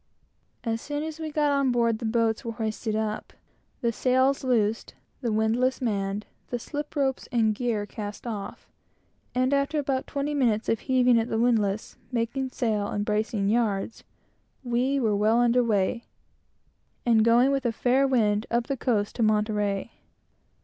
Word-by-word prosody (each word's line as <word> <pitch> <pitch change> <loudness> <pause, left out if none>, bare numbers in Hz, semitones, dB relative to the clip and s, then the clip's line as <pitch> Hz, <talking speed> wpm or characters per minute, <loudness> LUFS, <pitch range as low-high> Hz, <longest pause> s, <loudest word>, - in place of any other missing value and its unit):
As 225 -1 -2
soon 290 0 -3
as 315 0 -6
we 315 -1 -4
got 295 -1 +2
on 275 -2 +2
board, 230 -2 +1
the 235 - -5
boats 225 0 +1
were 230 -2 -4
hoisted 220 -1 -3
up, 215 -1 -3 0.5
the 235 -2 +1
sails 260 +4 +2
loosed, 225 -4 0 0.3
the 235 -3 -1
windlass 225 +4 +1
manned, 205 -3 -2 0.2
the 245 - -1
slip 295 +5 -6
ropes 270 -2 0
and 225 -3 +2
gear 220 -2 -1
cast 205 +2 -7
off; 215 -4 -6 0.7
and 255 +2 +2
after 280 +2 +1
about 270 -2 -1
twenty 285 +1 -2
minutes 235 -6 +1
of 225 - +1
heaving 250 -2 +3
at 225 - -2
the 225 - -1
windlass, 220 -3 +1
making 250 +2 -1
sail, 215 -5 -1
and 205 0 -2
bracing 210 -1 0
yards, 215 -2 0 0.6
we 255 +3 +1
were 220 -5 +1
well 215 +3 +3
under 245 +1 +4
weigh, 220 +1 0 1.0
and 225 -2 +4
going 240 +4 +5
with 275 -1 0
a - - +1
fair 255 +4 +2
wind 215 -4 +1
up 235 0 +1
the 275 - -2
coast 215 -5 0
to - - -1
Monterey. 210 -1 +1
235 Hz, 165 wpm, -26 LUFS, 215-260 Hz, 1.0 s, going